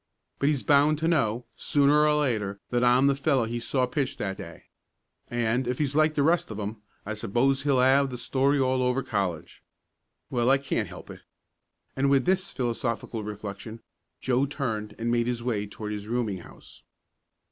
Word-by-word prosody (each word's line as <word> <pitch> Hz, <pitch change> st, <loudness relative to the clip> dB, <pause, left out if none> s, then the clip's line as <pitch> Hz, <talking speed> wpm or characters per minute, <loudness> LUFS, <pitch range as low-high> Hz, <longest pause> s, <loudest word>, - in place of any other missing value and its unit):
But 140 Hz, -, +2 dB
he's 145 Hz, -4 st, 0 dB
bound 145 Hz, +1 st, +4 dB
to 160 Hz, +2 st, -1 dB
know, 125 Hz, -8 st, +1 dB
sooner 150 Hz, +1 st, +3 dB
or 150 Hz, -, +3 dB
later, 110 Hz, -9 st, -1 dB
that 120 Hz, 0 st, +1 dB
I'm 125 Hz, +2 st, +5 dB
the 140 Hz, -, +4 dB
fellow 135 Hz, -3 st, +1 dB
he 120 Hz, +1 st, -3 dB
saw 125 Hz, +2 st, 0 dB
pitch 130 Hz, +1 st, -2 dB
that 95 Hz, -2 st, -3 dB
day, -, -, -10 dB, 0.7 s
and, 120 Hz, +1 st, 0 dB
if 125 Hz, 0 st, -1 dB
he's 145 Hz, -2 st, -1 dB
like 155 Hz, 0 st, +3 dB
the 145 Hz, -, +2 dB
rest 170 Hz, +4 st, +2 dB
of 110 Hz, -1 st, -6 dB
'em 105 Hz, +1 st, -5 dB, 0.2 s
I 105 Hz, -, -3 dB
suppose 120 Hz, +6 st, +1 dB
he'll 140 Hz, -2 st, +2 dB
have 135 Hz, +2 st, +4 dB
the 125 Hz, -, -6 dB
story 135 Hz, +4 st, +1 dB
all 130 Hz, -1 st, +1 dB
over 125 Hz, +1 st, +1 dB
college. 95 Hz, -6 st, -3 dB, 0.7 s
Well, 120 Hz, -1 st, +1 dB
I 135 Hz, -, +6 dB
can't 135 Hz, 0 st, -2 dB
help -, -, -10 dB
it." -, -, -11 dB, 0.8 s
And 135 Hz, +1 st, +1 dB
with 135 Hz, -2 st, +3 dB
this 190 Hz, +1 st, +1 dB
philosophical 115 Hz, -2 st, -3 dB
reflection 105 Hz, +1 st, -7 dB, 0.4 s
Joe 130 Hz, -, +1 dB
turned 110 Hz, -7 st, -4 dB
and 115 Hz, +1 st, -1 dB
made 120 Hz, 0 st, +1 dB
his 120 Hz, -1 st, -2 dB
way 105 Hz, -4 st, -1 dB
toward 105 Hz, +1 st, -6 dB
his 105 Hz, 0 st, -5 dB
rooming 115 Hz, -5 st, -1 dB
house. -, -, -14 dB
125 Hz, 185 wpm, -27 LUFS, 110-140 Hz, 0.8 s, I